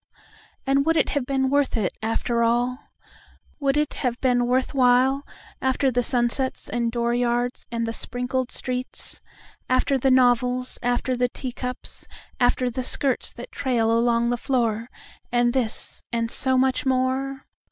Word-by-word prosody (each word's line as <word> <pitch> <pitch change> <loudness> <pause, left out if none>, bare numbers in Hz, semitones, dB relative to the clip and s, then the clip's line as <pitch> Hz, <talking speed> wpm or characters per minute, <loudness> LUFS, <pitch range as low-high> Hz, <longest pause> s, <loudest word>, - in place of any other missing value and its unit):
And 275 +1 +3
would 325 0 +3
it - - +2
have 280 -4 -1
been 265 -1 0
worth 285 -3 +2
it, 205 -4 -1
after 230 +1 0
all, 240 +3 +1 0.7
Would 275 0 +1
it 300 -1 0
have 245 -2 -2
been 245 -2 +2
worth 255 +3 +1
while, 260 +1 +3 0.4
After 265 +1 +1
the 245 0 +1
sunsets 245 +2 0
and 240 -1 -1
the 240 - -6
dooryards 240 +1 0
and 230 -1 -1
the 225 - -3
sprinkled 250 +2 -2
streets, 255 0 -4 0.5
After 255 +1 +2
the 265 - +2
novels, 250 0 +2
after 245 +1 0
the 250 0 +1
teacups, 250 0 -4 0.3
after 250 0 +2
the 255 +2 -3
skirts 265 0 +2
that 240 - -10
trail 245 -5 0
along 235 0 +2
the 245 - 0
floor—And 240 0 -1
this, 245 -4 -1
and 230 -1 -1
so 260 -1 +2
much 260 0 +2
more? 265 +1 -1
250 Hz, 150 wpm, -24 LUFS, 240-265 Hz, 0.7 s, And